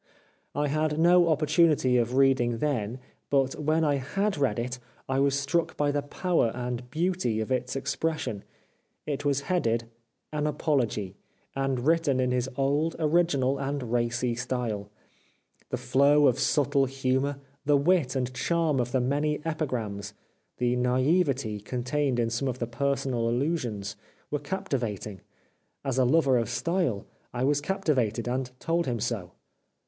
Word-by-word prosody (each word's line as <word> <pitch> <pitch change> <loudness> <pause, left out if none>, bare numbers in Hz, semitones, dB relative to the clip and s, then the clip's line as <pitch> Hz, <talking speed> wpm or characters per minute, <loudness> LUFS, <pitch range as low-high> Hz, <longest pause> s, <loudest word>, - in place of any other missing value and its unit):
I 145 +1 +1
had 155 +1 0
no 175 +1 +5
opportunity 155 -3 +3
of 120 +1 0
reading 130 -3 +3
then, 120 -4 -1 0.3
but 135 -1 +2
when 155 +2 +1
I 145 -2 +2
had 195 +10 -1
read 140 -4 0
it 125 +2 -3 0.3
I 135 0 0
was 140 0 +2
struck 160 +4 -1
by 145 -1 +2
the 145 0 0
power 145 -3 0
and 125 0 -4
beauty 165 -7 0
of 110 +3 -3
its 125 0 -1
expresssion. 140 -5 -2 0.6
It 145 -1 -3
was 140 -1 +2
headed: 115 -10 0 0.3
'' 120 - -32
An 150 0 0
Apology," 125 -10 0 0.4
and 135 -2 -1
written 160 -4 +2
in 125 -1 +1
his 125 0 0
old, 145 +4 +1
original, 150 -5 +2
and 135 -3 -3
racy 120 0 0
style. 120 -4 -3 0.8
The - - -2
flow 140 +4 +4
of 125 - +3
subtle 140 -2 +2
humour, 135 +1 -1 0.3
the 145 0 +4
wit 145 -3 +2
and 125 -1 -1
charm 160 0 +1
of 125 +1 -2
the 130 - +3
many 145 +4 0
epigrams, 115 -11 -3 0.4
the 125 0 +1
naivete 130 - +1
contained 125 +4 -1
in 115 -1 0
some 120 +4 -1
of 125 -1 -2
the 120 - -2
personal 125 -1 -1
allusions, 120 -7 -2 0.4
were 150 - 0
captivating. 125 - -3 0.6
As 135 -1 0
a 130 - +4
lover 135 -2 +4
of 115 -2 -2
style, 130 - -1 0.3
I 120 - -1
was 145 +1 +2
capti 190 0 0
vated, 120 -2 -1
and 125 +1 -1
told 170 -1 0
him 120 -2 -1
so. 105 -5 -3
135 Hz, 155 wpm, -27 LUFS, 120-150 Hz, 0.8 s, no